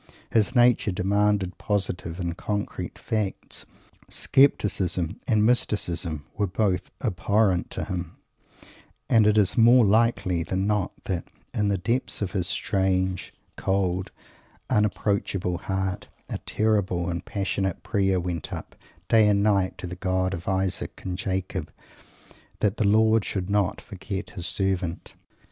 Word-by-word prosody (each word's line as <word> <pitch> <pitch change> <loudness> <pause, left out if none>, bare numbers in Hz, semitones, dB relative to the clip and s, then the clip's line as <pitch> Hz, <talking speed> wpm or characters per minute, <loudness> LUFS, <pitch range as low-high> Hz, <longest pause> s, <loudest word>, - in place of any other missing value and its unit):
His 110 0 +2
nature 120 -4 +4
demanded 100 0 +1
positive 95 -4 -2
and 85 -2 -2
concrete 105 +2 -4
facts. 105 -3 -3 0.4
Scepticism 95 - +2
and 110 -2 +3
mysticism 90 - 0
were 105 -1 0
both 95 0 0
abhorrent 100 -3 +1
to - - -4
him; 90 -4 -5 0.9
and 110 -2 +6
it 105 0 +4
is 105 +3 +3
more 120 +1 +7
likely 100 -4 +2
than 95 +3 -1
not 105 -2 0
that, 90 -4 -3 0.3
in 105 -1 +1
the 100 -1 +1
depths 115 +8 -1
of 95 - -3
his 90 -3 -1
strange 95 -2 0 0.3
cold, 95 -1 0 0.6
unapproachable 100 -4 0
heart, 95 +2 -2 0.2
a - - -2
terrible 100 -5 +1
and 85 0 -3
passionate 95 -2 -2
prayer 95 -3 +1
went 85 -3 -4
up, - - -7 0.3
day 110 -2 +5
and 100 -1 +3
night, 100 -3 +2
to - - -6
the 90 0 -5
God 95 0 0
of 85 -2 -6
Isaac 95 -1 -1
and 90 -1 -2
Jacob 95 -1 -3 0.9
that 105 0 +1
the 105 - +2
Lord 110 +1 +4
should 95 0 -3
not 100 -3 +1
forget 95 -1 -6
his 90 -4 -2
Servant. 95 -3 -1
95 Hz, 135 wpm, -25 LUFS, 90-105 Hz, 0.9 s, more